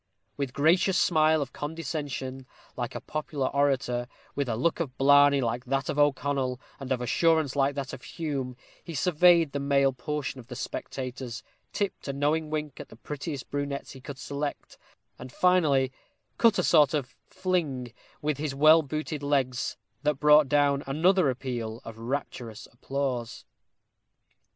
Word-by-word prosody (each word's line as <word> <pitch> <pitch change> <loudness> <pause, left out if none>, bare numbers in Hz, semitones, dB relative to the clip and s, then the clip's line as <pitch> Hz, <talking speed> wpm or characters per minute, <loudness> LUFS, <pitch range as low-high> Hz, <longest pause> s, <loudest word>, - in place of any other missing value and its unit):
With 140 -2 -2
a - - -21
gracious 175 +6 +3
smile 155 -2 +3
of 130 - -12
condescension, 145 -4 -5 0.3
like - - -4
a - - -4
popular 150 -3 -3
orator 135 -4 0 0.3
with 140 -3 -2
a 115 - 0
look 165 +10 0
of 140 -6 -4
blarney 145 0 +6
like 120 +1 -2
that 135 +2 -1
of 145 - -1
O'Connell, 140 -3 +1 0.2
and 135 -1 -7
of 125 -1 +1
assurance 160 +3 +2
like 140 0 +2
that 140 -2 -4
of - - -7
Hume 135 -3 -4 0.3
he 165 - -7
surveyed 170 0 +4
the 140 - -2
male 140 -1 +2
portion 140 +2 -4
of 120 - -12
the 125 - -8
spectators, 125 -2 -5 0.3
tipped 200 -6 -3
a 140 - -2
knowing 150 +3 0
wink 150 -2 -4
at - - -8
the - - -13
prettiest 145 +3 -6
brunettes 145 -1 -3
he 130 - -11
could 135 +1 -8
select, 145 +1 -5 0.4
and 125 0 -9
finally 150 -8 +3 0.5
cut 230 -2 +5
a 180 - +2
sort 150 -4 +5
of 140 -3 -3
fling 160 -10 -2 0.3
with 150 -2 -1
his 145 -3 -2
well 155 +3 +7
booted 155 0 -4
legs, 135 -3 0 0.2
that 150 0 +1
brought 150 -1 +6
down 145 -1 +3
another 165 +3 +3
appeal 120 -3 -4
of 115 -1 -9
rapturous 115 -3 -5
applause. 125 -2 -3
140 Hz, 160 wpm, -27 LUFS, 130-155 Hz, 0.5 s, well